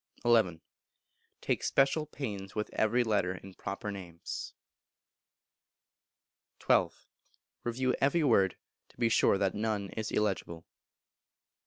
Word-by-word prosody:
xi. 110 Hz, -9 st, +3 dB, 0.8 s
Take -, -, 0 dB
special 145 Hz, +3 st, +2 dB
pains 100 Hz, -10 st, -6 dB
with 105 Hz, 0 st, -2 dB
every 120 Hz, +3 st, +2 dB
letter 100 Hz, -5 st, +1 dB
in 95 Hz, +1 st, -11 dB
proper 100 Hz, +3 st, -5 dB
names. 90 Hz, -4 st, -7 dB, 2.1 s
xii. -, -, +5 dB, 0.8 s
Review 125 Hz, +2 st, 0 dB
every 155 Hz, +4 st, +3 dB
word, 100 Hz, -9 st, +3 dB, 0.3 s
to -, -, -24 dB
be 115 Hz, -, +2 dB
sure 105 Hz, -, +4 dB
that 95 Hz, -1 st, +1 dB
none 105 Hz, -2 st, -1 dB
is 110 Hz, -1 st, -4 dB
illegible. 95 Hz, -5 st, -1 dB
105 Hz, 110 wpm, -31 LUFS, 95-120 Hz, 2.1 s, xii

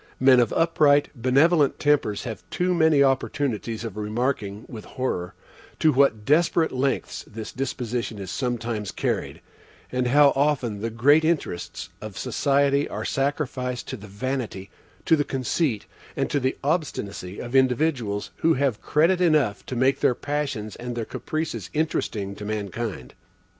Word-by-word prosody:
Men 130 Hz, -1 st, +6 dB
of 120 Hz, -3 st, +2 dB
upright, 150 Hz, -3 st, +3 dB
benevolent 140 Hz, +4 st, +3 dB
tempers 145 Hz, -8 st, +1 dB
have 115 Hz, -4 st, -6 dB
too 180 Hz, 0 st, 0 dB
many 160 Hz, -4 st, +4 dB
opportunities 130 Hz, -4 st, -1 dB
of 110 Hz, -3 st, -6 dB
remarking, 105 Hz, -1 st, -2 dB
with 110 Hz, -4 st, -8 dB
horror, 90 Hz, -9 st, -3 dB, 0.4 s
to 155 Hz, -1 st, +3 dB
what 125 Hz, -6 st, +3 dB
desperate 160 Hz, +2 st, +3 dB
lengths 135 Hz, +1 st, -1 dB
this 110 Hz, 0 st, -7 dB
disposition 120 Hz, -3 st, -3 dB
is 95 Hz, -3 st, -6 dB
sometimes 115 Hz, -5 st, -2 dB
carried, -, -, -2 dB, 0.5 s
and 125 Hz, 0 st, 0 dB
how 140 Hz, +2 st, +6 dB
often 130 Hz, -7 st, 0 dB
the 115 Hz, -, -1 dB
great 140 Hz, +8 st, +4 dB
interests 90 Hz, -, -2 dB
of 110 Hz, -2 st, -8 dB
society 140 Hz, 0 st, +1 dB
are -, -, -4 dB
sacrificed 135 Hz, -3 st, -2 dB
to -, -, -3 dB
the 105 Hz, -3 st, -11 dB
vanity, 105 Hz, -2 st, -4 dB, 0.3 s
to 160 Hz, -, +5 dB
the 145 Hz, -, +1 dB
conceit, 130 Hz, -2 st, -1 dB, 0.3 s
and -, -, -1 dB
to 145 Hz, -, +2 dB
the 130 Hz, 0 st, -1 dB
obstinacy 105 Hz, -, -2 dB
of 120 Hz, +1 st, -7 dB
individuals, 125 Hz, -5 st, +1 dB
who 165 Hz, 0 st, +3 dB
have 130 Hz, -5 st, 0 dB
credit 170 Hz, +5 st, +2 dB
enough 150 Hz, -, +2 dB
to 130 Hz, -, -4 dB
make 130 Hz, +3 st, +2 dB
their 125 Hz, -, +3 dB
passions 140 Hz, -8 st, -3 dB
and 120 Hz, 0 st, -5 dB
their 115 Hz, -2 st, -3 dB
caprices 155 Hz, +7 st, -4 dB
interesting 110 Hz, -10 st, -1 dB
to 105 Hz, -, -9 dB
mankind. 105 Hz, -, -4 dB
130 Hz, 145 wpm, -24 LUFS, 110-145 Hz, 0.5 s, Men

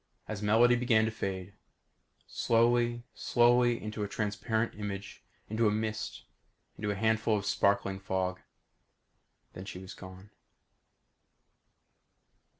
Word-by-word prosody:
As 105 Hz, -2 st, -5 dB
Melody 115 Hz, +4 st, +5 dB
began 120 Hz, -3 st, +3 dB
to 110 Hz, -, -1 dB
fade. 95 Hz, -3 st, -4 dB, 0.7 s
Slowly, 120 Hz, +1 st, +2 dB
slowly, 120 Hz, 0 st, +3 dB
into 105 Hz, 0 st, -5 dB
a 105 Hz, -, -1 dB
transparent 110 Hz, +2 st, -1 dB
image, 100 Hz, -1 st, -6 dB, 0.3 s
into 110 Hz, +1 st, +1 dB
a -, -, +3 dB
mist, 110 Hz, 0 st, -3 dB, 0.5 s
into 105 Hz, -, -3 dB
a 100 Hz, -, 0 dB
handful 110 Hz, +1 st, +2 dB
of 100 Hz, -, -4 dB
sparkling 100 Hz, -1 st, +1 dB
fog. 95 Hz, -1 st, -2 dB, 1.1 s
Then 95 Hz, -, -8 dB
she 95 Hz, -, -7 dB
was 95 Hz, 0 st, -9 dB
gone. 95 Hz, +2 st, -12 dB
105 Hz, 115 wpm, -31 LUFS, 100-115 Hz, 1.1 s, Melody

